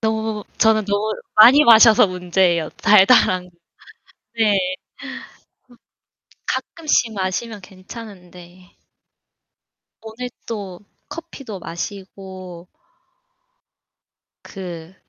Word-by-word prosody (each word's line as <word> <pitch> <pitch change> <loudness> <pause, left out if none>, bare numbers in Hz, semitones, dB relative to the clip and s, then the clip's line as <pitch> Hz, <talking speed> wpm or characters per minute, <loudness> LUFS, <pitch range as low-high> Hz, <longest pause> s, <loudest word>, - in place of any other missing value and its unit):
너무 220 -1 -2
저는 220 -1 +3
너무 205 +2 -1 0.2
많이 250 +8 +7
마셔서 225 -1 +7
문제예요, 180 -2 0
달달한 190 -3 +4
거. - - -21 0.9
네. 220 -2 +2
어 - - +2 1.9
가끔씩 295 -8 -1
마시면 200 +3 -4
괜찮은데 185 -2 -14 1.3
오늘 235 +3 -8 0.2
또 200 -5 -7 0.3
커피도 275 - -9
마시고 185 0 -9 1.7
그 175 -2 -10
200 Hz, 165 characters per minute, -19 LUFS, 185-220 Hz, 1.9 s, 많이